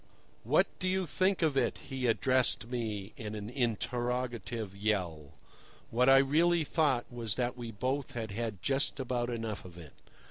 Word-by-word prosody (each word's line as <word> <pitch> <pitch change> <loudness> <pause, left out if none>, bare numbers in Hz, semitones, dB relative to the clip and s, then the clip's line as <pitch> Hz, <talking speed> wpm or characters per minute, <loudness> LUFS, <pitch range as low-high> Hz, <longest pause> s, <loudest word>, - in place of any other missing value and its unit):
"What - - +4
do 185 - -1
you 190 0 +1
think 185 +3 +1
of 155 -3 +2
it?" 130 -3 +1
he 130 -2 -3
addressed 125 0 +2
me 110 -5 -3
in 110 -1 -5
an 105 +2 -6
interrogative 120 -3 -2
yell. 90 -8 -1 0.6
What 125 +3 +4
I 135 - +9
really 160 +5 +4
thought 145 -6 +1
was 115 -4 -1
that 125 0 -1
we 120 -2 -6
both 130 +6 -2
had 110 -3 -4
had 105 -3 -4
just 135 +1 +1
about 125 -2 -1
enough 115 -3 -3
of 90 -1 -12
it. 80 -5 -11
120 Hz, 165 wpm, -32 LUFS, 110-135 Hz, 0.6 s, I